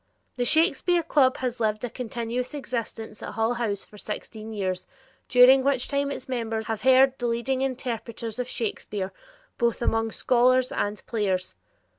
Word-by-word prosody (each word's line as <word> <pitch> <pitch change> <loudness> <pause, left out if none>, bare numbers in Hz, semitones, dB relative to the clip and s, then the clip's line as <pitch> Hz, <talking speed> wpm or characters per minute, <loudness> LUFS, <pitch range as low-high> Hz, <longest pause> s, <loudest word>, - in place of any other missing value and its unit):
The 245 - -1
Shakespeare 340 +4 +3
club 270 -5 +3
has 250 -1 -3
lived 215 -1 0
a 245 - -2
continuous 245 +2 -4
existence 230 -5 -5
at - - -6
Hull 225 +2 +1
House 220 -5 -2
for 210 - -15
sixteen 220 +1 -6
years 185 -3 -3 0.4
during 255 +2 +7
which 270 -2 +1
time 280 0 0
its 275 - -5
members 225 -3 -2
have 220 -1 -3
heard 265 +1 +5
the 245 - -1
leading 235 +3 -1
interpreters 235 -3 -3
of 250 - -2
Shakespeare, 210 -5 -3 0.5
both 235 -2 +1
among 225 -1 +1
scholars 255 +2 +3
and 205 +1 -2
players. 190 -5 -1
240 Hz, 155 wpm, -26 LUFS, 220-255 Hz, 0.5 s, during